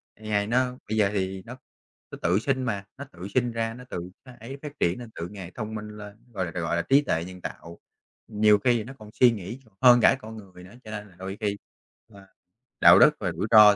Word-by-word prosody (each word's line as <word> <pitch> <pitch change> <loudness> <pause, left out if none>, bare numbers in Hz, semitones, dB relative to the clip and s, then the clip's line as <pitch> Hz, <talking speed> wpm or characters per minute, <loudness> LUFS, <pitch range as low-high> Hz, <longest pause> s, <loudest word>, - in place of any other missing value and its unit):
AI 105 -1 -1
nó 125 +2 +1
bây 110 - -1
giờ 105 -2 +4
thì 95 -1 -2
nó 125 +3 -9 0.5
nó - - -7
tự 90 +4 +2
sinh 130 +2 -1
mà, 100 -5 -2
nó 140 - -7
tự 90 +2 -8
sinh 125 -2 +1
ra, 115 0 -2
nó 125 - -11
tự 90 0 -5 0.2
nó 130 - -12
ấy 130 +5 -8
phát 150 -1 -9
triển 85 +6 +1
nên, 120 -2 -9
tự 85 - -5
ngày 95 -4 -8
thông 110 0 -5
minh 105 0 -6
lên, 105 0 -10 0.2
gọi 95 -3 -1
là 85 - -6
gọi 85 +1 -1
là 85 - +1
trí 140 +2 +4
tuệ 85 - -1
nhân 90 0 -10
tạo. 85 -1 -8 0.5
Nhiều 105 -1 +4
khi 120 +1 +2
nó 130 +5 -9
còn 105 -1 -12
suy 125 -1 +7
nghĩ 110 +3 -6
còn 110 - -25
hơn 125 -1 +7
cả 135 - +5
con 110 0 -9
người 95 -4 -13
nữa, 95 +3 -14
cho 110 - -10
nên 105 -1 -6
là 90 - -21
đôi 95 +2 -6
khi 100 -1 -1 0.5
và 100 -3 -16 0.5
đạo - - +9
đức - - +8
và - - -1
rủi - - -3
ro 105 -1 +9
105 Hz, 250 wpm, -26 LUFS, 95-120 Hz, 0.5 s, đạo